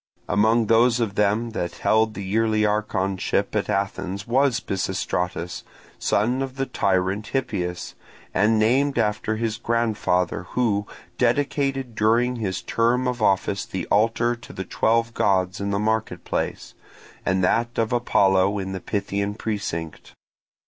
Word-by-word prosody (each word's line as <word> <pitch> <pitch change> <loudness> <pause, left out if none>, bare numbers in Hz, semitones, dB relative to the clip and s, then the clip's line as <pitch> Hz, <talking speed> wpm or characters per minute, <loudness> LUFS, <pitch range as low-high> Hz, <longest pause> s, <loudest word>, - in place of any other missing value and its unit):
Among 110 +4 +3
those 115 +2 +4
of 110 -4 -1
them 105 +3 +1
that 85 -5 -3
held 110 0 +2
the 100 - -5
yearly 110 +2 +1
archonship 100 -3 -1
at - - 0
Athens 100 0 -2
was 130 0 +2
Pisistratus, 90 -2 -2 0.4
son 120 +6 +1
of 135 -1 -4
the 135 0 -1
tyrant 95 -1 0
Hippias, 95 -10 -3 0.4
and 110 +1 +3
named 130 +6 +2
after 110 -1 0
his 110 0 -2
grandfather, 110 -7 0
who 105 -5 +1 0.3
dedicated 135 0 0
during 115 +3 +2
his 95 -5 -3
term 120 +2 +1
of 125 -2 -2
office 100 -1 +1
the 95 -3 -5
altar 115 +3 +2
to 120 - -12
the 95 - -6
twelve 115 +4 +1
gods 95 -3 +1
in 100 - -1
the 100 - 0
market 110 +1 -1
place, - - -3 0.5
and 95 0 +1
that 120 +6 +1
of 115 +1 0
Apollo 100 -4 +3
in 95 -1 -4
the 95 -1 -5
Pythian 100 +1 -2
precinct. 100 -8 -5
110 Hz, 140 wpm, -23 LUFS, 95-115 Hz, 0.5 s, those